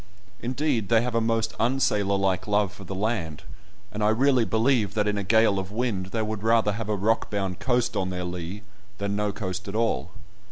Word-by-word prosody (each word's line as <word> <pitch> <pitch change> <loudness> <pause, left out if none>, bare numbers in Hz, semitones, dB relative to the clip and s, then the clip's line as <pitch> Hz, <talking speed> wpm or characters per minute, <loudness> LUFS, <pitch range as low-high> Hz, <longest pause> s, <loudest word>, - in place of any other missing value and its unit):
Indeed, 125 -4 -1
they 115 0 +4
have 125 -1 -2
a 115 - +2
most 115 0 0
unsailor 105 -5 +2
like 95 -1 0
love 105 -2 +1
for 100 - -11
the 95 +1 -6
land, 95 -7 -2 0.5
and 105 0 -3
I 105 - +4
really 125 +1 +3
believe 110 -3 +1
that 105 -1 +1
in 105 - +1
a 100 - -1
gale 110 0 +4
of 95 0 -5
wind 105 -5 -1
they 110 +3 -2
would 110 -1 -3
rather 115 -1 +3
have 110 +1 -4
a 105 - +1
rock 110 +3 +1
bound 95 -3 -2
coast 125 -2 +1
on 95 -1 0
their 90 -1 -3
lee 90 +3 -5 0.3
than 100 0 -2
no 105 0 0
coast 95 -1 -5
at 100 - -5
all. 100 - 0
105 Hz, 210 wpm, -26 LUFS, 95-115 Hz, 0.5 s, they